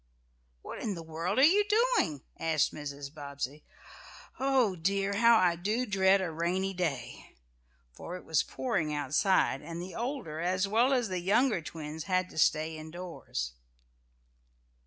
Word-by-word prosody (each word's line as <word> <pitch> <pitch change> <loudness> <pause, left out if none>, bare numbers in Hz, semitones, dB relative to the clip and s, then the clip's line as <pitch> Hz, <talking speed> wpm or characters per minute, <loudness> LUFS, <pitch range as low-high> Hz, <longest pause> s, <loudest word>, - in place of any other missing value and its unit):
"What - - -7
in 205 -3 -2
the 165 - -7
world 165 +5 -3
are 265 - +6
you 385 +8 +6
doing?" 420 - +1 0.2
asked 160 -2 +1
Mrs. 140 -1 -7
Bobbsey. 140 -1 -6 0.8
"Oh, 260 -7 +2
dear, 195 +4 0
how 230 +1 +6
I 180 -4 +3
do 210 +8 -1
dread 195 -2 +3
a 180 -3 -2
rainy 180 +4 -1
day!" 140 -10 -4 0.6
for 175 - -7
it - - -14
was 160 -3 +2
pouring 195 -12 -2
outside, 145 +1 +2
and 165 +2 -7
the 180 +1 -7
older, 235 - -4
as 185 +3 0
well 230 +6 +3
as 245 -5 +1
the 185 -1 -2
younger 210 +3 +2
twins 155 -1 -7
had 185 -1 0
to - - -5
stay 155 +1 +2
in 155 0 -8
doors. 165 - -5
180 Hz, 155 wpm, -30 LUFS, 155-210 Hz, 0.8 s, are